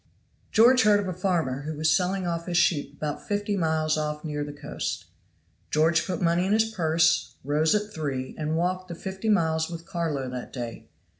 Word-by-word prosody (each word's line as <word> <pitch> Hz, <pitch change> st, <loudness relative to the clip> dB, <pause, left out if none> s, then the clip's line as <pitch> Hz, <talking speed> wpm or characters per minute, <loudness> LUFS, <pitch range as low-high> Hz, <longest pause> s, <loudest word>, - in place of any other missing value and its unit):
GEORGE 250 Hz, +3 st, +6 dB
heard 210 Hz, -1 st, +5 dB
of 200 Hz, -, -3 dB
a 185 Hz, -, -2 dB
farmer 165 Hz, -7 st, 0 dB
who 155 Hz, +2 st, -5 dB
was 155 Hz, +1 st, +3 dB
selling 185 Hz, 0 st, 0 dB
off 170 Hz, 0 st, -3 dB
his 175 Hz, -1 st, 0 dB
sheep 170 Hz, -4 st, +2 dB
about 150 Hz, -1 st, -4 dB
fifty 205 Hz, 0 st, -1 dB
miles 160 Hz, -3 st, +1 dB
off 150 Hz, 0 st, -3 dB
near 150 Hz, -1 st, -2 dB
the 145 Hz, -, -6 dB
coast. 145 Hz, -, -5 dB, 0.6 s
George 165 Hz, +2 st, +2 dB
put 185 Hz, -, -2 dB
money 175 Hz, +1 st, +2 dB
in 200 Hz, -, +2 dB
his 220 Hz, +1 st, +4 dB
purse, 160 Hz, -4 st, +2 dB
rose 150 Hz, +5 st, +2 dB
at 210 Hz, 0 st, -2 dB
three, 135 Hz, -6 st, -3 dB
and 155 Hz, +1 st, -2 dB
walked 185 Hz, +2 st, -1 dB
the 170 Hz, -, -6 dB
fifty 190 Hz, +5 st, -4 dB
miles 160 Hz, -5 st, +2 dB
with 170 Hz, -1 st, -7 dB
Carlo 165 Hz, -7 st, -2 dB
that 125 Hz, -1 st, -6 dB
day. 120 Hz, -3 st, -6 dB
165 Hz, 195 wpm, -26 LUFS, 150-185 Hz, 0.6 s, GEORGE